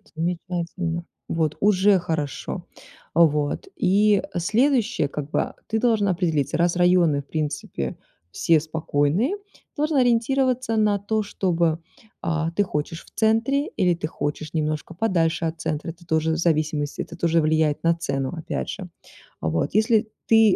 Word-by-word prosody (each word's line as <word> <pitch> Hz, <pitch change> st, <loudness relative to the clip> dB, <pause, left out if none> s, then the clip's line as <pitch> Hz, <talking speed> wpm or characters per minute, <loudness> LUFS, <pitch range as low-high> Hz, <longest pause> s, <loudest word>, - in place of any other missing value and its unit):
Замечательно, 170 Hz, 0 st, -3 dB, 0.2 s
вот 160 Hz, -2 st, 0 dB
уже 200 Hz, 0 st, +5 dB
хорошо. 160 Hz, -5 st, -3 dB, 0.5 s
А, 170 Hz, -, +4 dB
вот 150 Hz, -, -1 dB
и, 200 Hz, +1 st, +3 dB
э, 175 Hz, -, -1 dB
следующее 235 Hz, -, +2 dB
как 145 Hz, 0 st, -5 dB
бы, -, -, +1 dB
а, -, -, -5 dB
ты 220 Hz, -, 0 dB
должен 220 Hz, -4 st, +2 dB
определиться: 170 Hz, -6 st, 0 dB
раз 170 Hz, +1 st, +2 dB
районы 175 Hz, -5 st, +4 dB
в 140 Hz, -, -22 dB
принципе 145 Hz, -, -3 dB, 0.3 s
все 165 Hz, -, +3 dB
спокойные, 160 Hz, -, 0 dB
ты -, -, -25 dB, 0.3 s
должен 300 Hz, 0 st, 0 dB
ориентироваться 255 Hz, 0 st, +2 dB
на 210 Hz, -2 st, +3 dB
то, 215 Hz, +2 st, 0 dB
чтобы, 170 Hz, -5 st, 0 dB, 0.4 s
а, 165 Hz, 0 st, -1 dB
ты 205 Hz, +4 st, +2 dB
хочешь 165 Hz, -2 st, -4 dB
в -, -, -19 dB
центре 230 Hz, +6 st, +2 dB
или 180 Hz, -3 st, +1 dB
ты 165 Hz, -2 st, -3 dB
хочешь 155 Hz, 0 st, -4 dB
немножко 155 Hz, +1 st, -2 dB
подальше 170 Hz, -4 st, +1 dB
от 160 Hz, 0 st, -3 dB
центра. 155 Hz, +2 st, -2 dB
Это 170 Hz, +1 st, -10 dB
тоже 160 Hz, -1 st, +1 dB
в -, -, -1 dB
зависимости, 155 Hz, -3 st, 0 dB
это 170 Hz, -, -7 dB
тоже 165 Hz, -1 st, +2 dB
влияет 155 Hz, -1 st, +1 dB
на 165 Hz, 0 st, +4 dB
цену 135 Hz, -5 st, -2 dB
опять 155 Hz, -, -4 dB
же. -, -, -6 dB, 0.5 s
А -, -, -3 dB
вот 80 Hz, +1 st, -1 dB
если 220 Hz, +1 st, +3 dB, 0.2 s
ты 225 Hz, -3 st, +6 dB
170 Hz, 160 wpm, -24 LUFS, 155-210 Hz, 0.5 s, ты